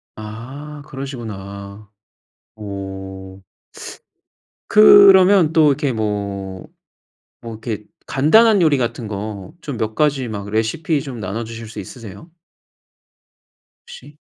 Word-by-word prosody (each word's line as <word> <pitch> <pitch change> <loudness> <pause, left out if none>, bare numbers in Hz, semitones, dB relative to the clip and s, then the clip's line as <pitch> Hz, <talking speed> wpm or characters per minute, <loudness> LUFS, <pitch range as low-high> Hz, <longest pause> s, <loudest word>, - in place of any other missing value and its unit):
아 130 +8 -9
그러시구나. 105 -7 -8 0.7
어 95 -2 -8 1.3
그러면 195 -4 +7
또 160 -2 +5
이렇게 145 -1 0
뭐 100 -3 -4 0.8
뭐 115 - -7
이렇게 110 -1 -6 0.2
간단한 205 +9 +4
요리 155 -3 +4
같은 120 -1 -3
거 100 -2 -6
좀 145 -6 -6
몇 110 -1 -3
가지 145 -3 +1
막 100 -2 -6
레시피 140 +8 -1
좀 125 -5 -8
나눠주실 115 +3 -6
수 110 - -10
있으세요? 110 - -11 1.6
혹시? 485 0 -13
115 Hz, 195 characters per minute, -19 LUFS, 100-150 Hz, 1.6 s, 그러면